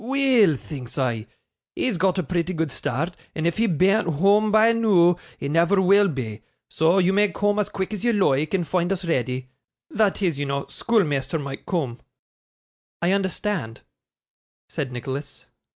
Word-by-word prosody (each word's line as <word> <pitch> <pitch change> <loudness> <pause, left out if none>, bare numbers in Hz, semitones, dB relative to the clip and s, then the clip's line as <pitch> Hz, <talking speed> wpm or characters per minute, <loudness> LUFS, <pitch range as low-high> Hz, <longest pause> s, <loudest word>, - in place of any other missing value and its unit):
"Weel!" 255 - +3
thinks 130 -2 -8
I, 120 -4 -1 0.5
"he's 240 -8 -1
got 185 +2 +1
a 185 - 0
pretty 180 +1 -2
good 160 -3 -1
start, 160 +10 -3 0.2
and 160 - -2
if 170 - 0
he 225 +1 +2
bean't 190 +4 +2
whoam 200 +7 +3
by 220 +2 +5
noo, 195 -7 +4 0.2
he - - -5
never 170 +6 +2
will 200 +2 +5
be; 115 - -5 0.3
so 165 +4 +2
you 190 0 +3
may 205 0 +3
coom 205 +1 0
as 210 - 0
quick 195 +2 -4
as 210 - -5
you 240 - +3
loike, 155 -6 +1
and 175 -3 -1
foind 180 0 0
us 190 -1 -2
reddy" 130 -4 -2 0.4
that 210 -2 +1
is, 165 -6 0
you 145 - -2
know, 140 0 -2
schoolmeasther 155 - 0
might 140 -2 -7
coom.' 135 -10 -2 1.0
'I 175 - +3
understand,' 190 - -2 0.9
said 135 -3 -4
Nicholas. 135 +3 -6
175 Hz, 165 wpm, -23 LUFS, 140-200 Hz, 1.0 s, by